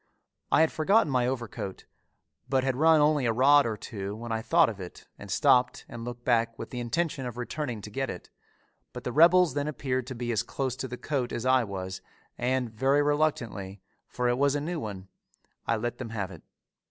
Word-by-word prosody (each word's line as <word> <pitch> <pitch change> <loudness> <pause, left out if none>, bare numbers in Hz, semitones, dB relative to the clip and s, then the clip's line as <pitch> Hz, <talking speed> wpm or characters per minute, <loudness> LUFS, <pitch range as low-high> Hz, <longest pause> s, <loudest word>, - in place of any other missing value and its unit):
I - - +5
had 160 - +3
forgotten 160 0 +3
my 125 -2 +2
overcoat, 115 -6 -5 0.6
but 130 -1 +2
had 135 -1 0
run 160 +2 +5
only 150 -4 +3
a - - +3
rod 140 +3 +5
or 110 -2 -3
two 100 -1 -6
when 115 +1 -7
I 110 0 -1
thought 165 +7 +4
of 105 -3 -5
it 90 - -10
and 100 - -10
stopped 125 - +3
and 115 -1 -8
looked 120 0 -7
back 115 -1 +2
with - - -7
the 125 - -4
intention 135 +2 -2
of 120 -1 -7
returning 125 -2 -4
to 105 - -9
get 135 +5 -2
it; 90 - -8 0.6
but - - -7
the 125 - -3
rebels 170 +2 +6
then 145 +1 -1
appeared 130 -4 -2
to 130 - -6
be 120 0 -3
as 110 -2 +1
close 130 +1 -3
to 130 - -4
the 125 0 -6
coat 135 -4 -2
as 120 - -4
I 130 -1 +4
was 95 -2 -5 0.3
and 125 -1 -1
very 135 +5 +2
reluctantly, 120 -10 -1 0.3
for 125 0 -2
it 120 +1 +1
was 140 0 +3
a - - +1
new 165 +3 -3
one, 100 -6 -6 0.6
I - - +2
let 120 +2 -3
them 125 -3 -5
have 100 -4 -4
it. 85 - -11
125 Hz, 215 wpm, -28 LUFS, 115-145 Hz, 0.6 s, rebels